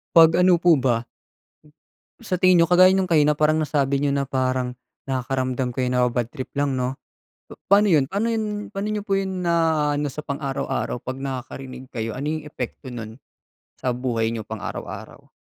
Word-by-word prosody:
'Pag 165 0 +8
ano 180 -1 +4
po 175 -2 +5
ba 120 -3 0 1.2
Sa 215 -6 -2
tingin 185 -1 +5
n'yo 165 - +5
kagaya 185 +1 +7
nung 190 -1 +1
kanina, 150 -3 +4
parang 155 +1 +2
nasabi 140 -2 +1
n'yo 145 -1 +1
na 140 -1 -1
parang 130 -1 -1 0.3
nakakaramdam 130 -1 -1
kayo, 125 +1 -1
naba-bad 125 -2 +1
trip 130 +1 -7
lang 140 -2 0
'no. 125 +1 -2 0.7
Pa'no 205 +1 +6
'yon 155 -7 +4
paano 200 +11 -1
'yon 215 -2 -2
pa'no 195 +1 -4
n'yo 210 - -1
po 200 -1 -1
'yon 190 -1 -2
naa-ano 160 -4 +1
sa 150 - -5
pang-araw-araw, 140 -4 -3
'pag 130 +2 -5
nakakarinig 130 -1 -6
kayo, 115 -2 -4
ano 135 +3 -5
yung 155 0 -3
epekto 130 -2 -7
no'n 110 -2 -7 0.6
sa 130 - -2
buhay 120 -2 -1
n'yo 115 -2 -5
pang 110 -2 -6
araw-araw? - - -7
140 Hz, 170 wpm, -23 LUFS, 125-170 Hz, 1.2 s, Pag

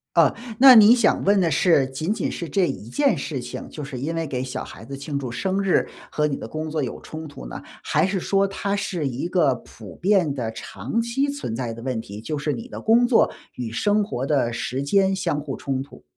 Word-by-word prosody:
呃， - - +5 0.2
那 260 0 +10
你 220 +1 +9
想 245 - +2
问 200 0 +4
的 170 -3 +2
是， 150 -2 +4
仅 145 +8 -2
仅 - - -2
是 170 - -5
这 190 +1 +1
一 105 - -6
件 280 - +2
事 140 -1 -4
情， 120 0 -7
就 150 - -7
是 135 -2 -6
因 155 +6 -3
为 165 -1 -2
给 130 -3 -3
小 130 - -4
孩 - - -11
子 135 +4 -8
庆 140 +1 -4
祝 130 -4 -5
生 190 +9 -1
日 195 -2 +2 0.2
和 150 - +1
你 140 -2 -1
的 - - -7
工 155 +5 -5
作 155 -1 -1
有 130 - -4
冲 160 0 -8
突 145 - -10
呢？ - - -7 0.2
还 - - +2
是 190 -1 -1
说 195 +2 +2
它 200 +1 -2
是 180 -7 -2
一 130 +5 -3
个 165 -8 +3
普 110 -5 -12
遍 185 -6 +2
的 115 -4 -3
长 115 - -4
期 255 +5 0
存 280 - -4
在 120 -2 -3
的 115 - -9
问 130 -2 -2
题， 105 0 -9
就 150 +7 -4
是 150 +1 -1
你 230 - -6
的 - - -7
工 235 +2 +5
作 240 - +4 0.2
与 120 -3 -5
生 205 - +2
活 135 -10 -3
的 140 -5 +1
时 130 +3 -3
间 190 +6 +2
相 150 -6 -1
互 145 - -5
冲 135 -1 -2
突？ 140 - -14
155 Hz, 255 characters per minute, -23 LUFS, 130-195 Hz, 0.2 s, 那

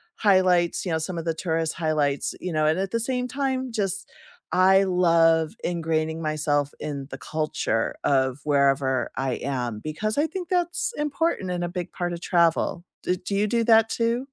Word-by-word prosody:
highlights, 185 -4 +3
you 175 - -2
know, - - +2
some 170 +2 -4
of 165 - -4
the 165 - 0
tourist 160 -1 -1
highlights, 150 -4 0
you 180 -2 -4
know, 155 0 +2
and 160 +4 +2
at 195 0 -2
the 230 -1 0
same 250 0 -1
time, 260 -1 -2
just 195 -3 -2 0.4
I 190 +2 +5
love 165 -3 +3
ingraining 160 -2 -1
myself 145 -2 0
in 140 -2 -5
the - - -5
culture 155 -7 -2
of 130 -1 +2
wherever 135 -3 +2
I 135 -1 0
am, 125 -5 -3
because 215 - -3
I 305 +2 +3
think 355 +1 -6
that's 350 +5 -1
important 295 - -1
and 175 -1 -1
a - - -2
big 180 0 -5
part 175 -1 -3
of 170 - -6
travel. 170 0 +1 0.2
Do 180 - 0
do 195 +2 -4
you 210 +1 +2
do 230 +1 +1
that 225 -1 +5
too? 230 +3 0
175 Hz, 185 wpm, -25 LUFS, 155-215 Hz, 0.4 s, I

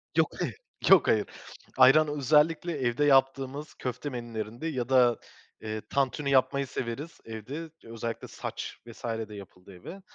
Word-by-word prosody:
Yok - - +3
hayır, - - -2 0.3
yok 190 -6 +7
hayır. 105 -2 +2 0.5
Ayran 155 +4 +7
özellikle 150 +4 +2
evde 130 +2 +1
yaptığımız 135 +1 +2
köfte 125 +3 -4
menülerinde 120 +1 -5
ya 130 -5 -3
da, 125 -3 +5 0.4
eee, 110 0 -4
tantuni 140 +1 0
yapmayı 140 +1 +2
severiz 130 +7 -5
evde. 130 +9 -7
Özellikle 115 0 -5
sac - - -6 0.2
vs. 115 - -12
de 110 -2 -4
yapıldığı 95 -1 -12
gibi. 185 - -10
130 Hz, 135 wpm, -28 LUFS, 115-145 Hz, 0.5 s, yok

